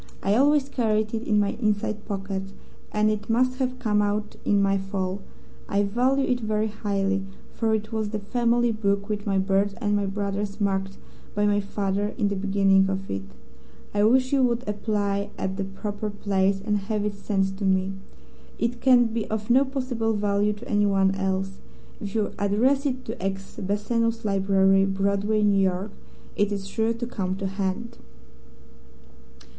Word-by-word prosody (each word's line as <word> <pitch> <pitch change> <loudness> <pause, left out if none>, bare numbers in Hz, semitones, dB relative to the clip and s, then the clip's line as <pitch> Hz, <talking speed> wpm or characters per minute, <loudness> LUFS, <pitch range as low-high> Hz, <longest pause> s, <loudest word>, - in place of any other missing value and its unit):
I 195 - +2
always 285 +2 +4
carried 215 -5 0
it 225 +1 -3
in 210 -2 +3
my 205 -1 +2
inside 210 0 -1
pocket, 195 -1 -4 0.4
and 215 0 +2
it 210 0 -4
must 255 +3 +2
have 255 -1 -1
come 215 -4 +1
out 210 +1 -1
in 205 - +3
my 195 0 +2
fall. 195 0 -3 0.5
I 200 0 +2
value 255 +6 +2
it 245 -1 +1
very 215 -1 0
highly, 195 -2 -1 0.3
for 225 -1 +1
it 215 +1 -4
was 220 -2 -1
the 215 - -2
family 235 +3 +1
book 200 -2 0
with 210 0 -3
my 195 -1 +2
birth 195 +1 +1
and 205 -3 +1
my 200 -1 0
brother's 200 +1 -3
marked 195 -1 -1 0.4
by 205 0 +2
my 205 0 +3
father 200 0 -2
in 205 -5 +1
the 200 - -1
beginning 195 -1 +3
of 195 0 -3
it. 95 - -2 0.7
I 205 0 +2
wish 255 +4 +3
you 275 - +4
would 245 -1 +1
apply 205 -1 -1
at 190 0 -3
the 195 - -1
proper 205 +2 -4
place 195 -1 +1
and 210 -2 +1
have 210 -1 0
it 210 - -1
sent 195 -1 -1
to - - -4
me. 190 0 +2 0.6
It 235 +1 -2
can 250 -2 +6
be 225 -1 -2
of 215 +1 -2
no 260 +3 +6
possible 255 -5 -1
value 205 0 +1
to 210 +4 -11
anyone 195 -2 +3
else. 195 0 -2 0.4
If 205 +1 -6
you 215 -2 0
address 255 +8 +2
it 255 -1 -3
to 220 -4 -6
X, 195 0 -4
Bassano's 225 +3 0
Library, 195 -1 +3
Broadway, 200 +2 +1
New 200 -1 +4
York, 190 +2 0 0.4
it 205 0 +1
is 200 -1 -3
sure 220 +3 0
to 235 +1 -4
come 190 -6 -2
to 195 0 -4
hand." 195 +3 -3
205 Hz, 175 wpm, -25 LUFS, 195-220 Hz, 0.7 s, can